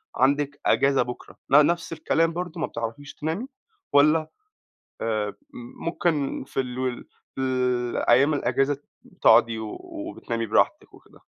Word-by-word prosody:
عندِك 140 Hz, +2 st, +1 dB
إجازة 135 Hz, 0 st, +3 dB
بكرة 125 Hz, -, -6 dB
ن 145 Hz, +2 st, +7 dB
نَفْس 170 Hz, +1 st, -1 dB
الكلام 165 Hz, +1 st, +1 dB
برضه، 175 Hz, 0 st, -5 dB
ما -, -, 0 dB
بتعرَفيش 115 Hz, +5 st, -6 dB
تنامي 165 Hz, -, -3 dB, 0.5 s
والَّا 155 Hz, +2 st, +4 dB, 0.7 s
آآ 105 Hz, -2 st, -1 dB, 0.5 s
ممكن 160 Hz, -6 st, -1 dB
في -, -, -4 dB
ال 125 Hz, -1 st, -3 dB
وال 130 Hz, -2 st, -3 dB, 0.3 s
في -, -, -3 dB
الأيام 125 Hz, +1 st, +2 dB
الإجازة 135 Hz, +1 st, +1 dB, 0.4 s
تقعُدي 115 Hz, -1 st, +5 dB
و 110 Hz, -1 st, -6 dB
وبتنامي 310 Hz, -, -5 dB
براحتِك -, -, +1 dB
وكده. -, -, -19 dB
140 Hz, 125 wpm, -25 LUFS, 125-160 Hz, 0.7 s, ن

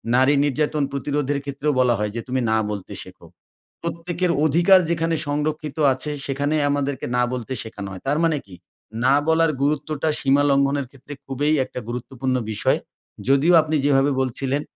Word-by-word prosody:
নারী 130 Hz, +3 st, +5 dB
নির্যাতন 150 Hz, +1 st, 0 dB
প্রতিরোধের 140 Hz, +1 st, -1 dB
ক্ষেত্রেও 140 Hz, +1 st, -1 dB
বলা 125 Hz, -1 st, +4 dB
হয় 105 Hz, 0 st, -1 dB
যে, 115 Hz, -, -2 dB
"তুমি 130 Hz, 0 st, -1 dB
না 110 Hz, -, +3 dB
বলতে 100 Hz, -3 st, -6 dB
শেখো।" -, -, -15 dB, 0.6 s
প্রত্যেকের 170 Hz, +1 st, -2 dB
অধিকার 175 Hz, +5 st, +5 dB
যেখানে 165 Hz, 0 st, 0 dB
সংরক্ষিত 150 Hz, +1 st, -2 dB, 0.2 s
আছে 130 Hz, +4 st, -4 dB
সেখানে 145 Hz, +2 st, -1 dB
আমাদেরকে 140 Hz, -2 st, -1 dB
না 125 Hz, -, +3 dB
বলতে 125 Hz, +1 st, -4 dB
শেখানো 105 Hz, -3 st, -7 dB
হয়। 95 Hz, -, -8 dB
তার 145 Hz, +2 st, +2 dB
মানে 165 Hz, -2 st, +2 dB
কি? 95 Hz, -, -12 dB, 0.5 s
না 135 Hz, +2 st, +5 dB
বলার 160 Hz, 0 st, +3 dB
গুরুত্বটা 150 Hz, +1 st, 0 dB
সীমা 140 Hz, +1 st, +3 dB
লঙ্ঘনের 140 Hz, 0 st, +1 dB
ক্ষেত্রে 140 Hz, +2 st, -11 dB
খুবই 145 Hz, +3 st, 0 dB
একটা 125 Hz, -, -7 dB
গুরুত্বপূর্ণ 130 Hz, +2 st, -3 dB, 0.2 s
বিষয়। -, -, +1 dB, 0.5 s
যদিও 140 Hz, +6 st, +4 dB
আপনি 155 Hz, 0 st, -2 dB
যেভাবে 140 Hz, 0 st, +3 dB
বলছিলেন 135 Hz, +2 st, -1 dB
140 Hz, 160 wpm, -22 LUFS, 130-155 Hz, 0.6 s, নারী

